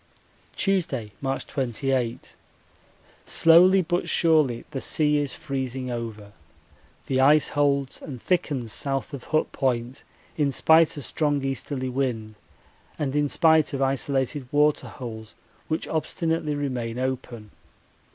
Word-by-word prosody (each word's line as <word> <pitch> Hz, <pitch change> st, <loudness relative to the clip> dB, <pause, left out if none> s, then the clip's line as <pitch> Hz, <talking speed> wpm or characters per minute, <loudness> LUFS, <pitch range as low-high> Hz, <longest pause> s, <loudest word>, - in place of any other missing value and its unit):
Tuesday, 150 Hz, -, -1 dB
March 135 Hz, 0 st, -2 dB
28. 130 Hz, -1 st, -2 dB, 0.9 s
Slowly 180 Hz, +3 st, +5 dB
but 175 Hz, +2 st, -1 dB
surely 155 Hz, -8 st, +2 dB
the 135 Hz, -, -4 dB
sea 150 Hz, -1 st, +1 dB
is 145 Hz, -2 st, -3 dB
freezing 130 Hz, -2 st, -4 dB
over. 110 Hz, -4 st, -6 dB, 0.7 s
The 130 Hz, -, 0 dB
ice 145 Hz, +2 st, +5 dB
holds 140 Hz, -2 st, 0 dB
and 130 Hz, -4 st, -8 dB
thickens 135 Hz, -, -1 dB
south 135 Hz, +1 st, -2 dB
of 135 Hz, -3 st, -7 dB
Hut 155 Hz, -, 0 dB
Point 125 Hz, -1 st, -2 dB, 0.3 s
in 145 Hz, -3 st, +1 dB
spite 160 Hz, +3 st, +4 dB
of 145 Hz, -, -6 dB
strong 145 Hz, -3 st, 0 dB
easterly 135 Hz, 0 st, -3 dB
wind 125 Hz, -4 st, -2 dB, 0.6 s
and 145 Hz, -2 st, -2 dB
in 145 Hz, -1 st, +1 dB
spite 160 Hz, -3 st, +3 dB
of 135 Hz, -, -3 dB
isolated 135 Hz, 0 st, -1 dB
water 150 Hz, 0 st, +2 dB
holes 110 Hz, -4 st, -9 dB, 0.3 s
which 160 Hz, -, -2 dB
obstinately 160 Hz, -1 st, -1 dB
remain 125 Hz, -5 st, -3 dB
open. 125 Hz, -4 st, -4 dB
135 Hz, 120 wpm, -25 LUFS, 125-150 Hz, 0.9 s, Slowly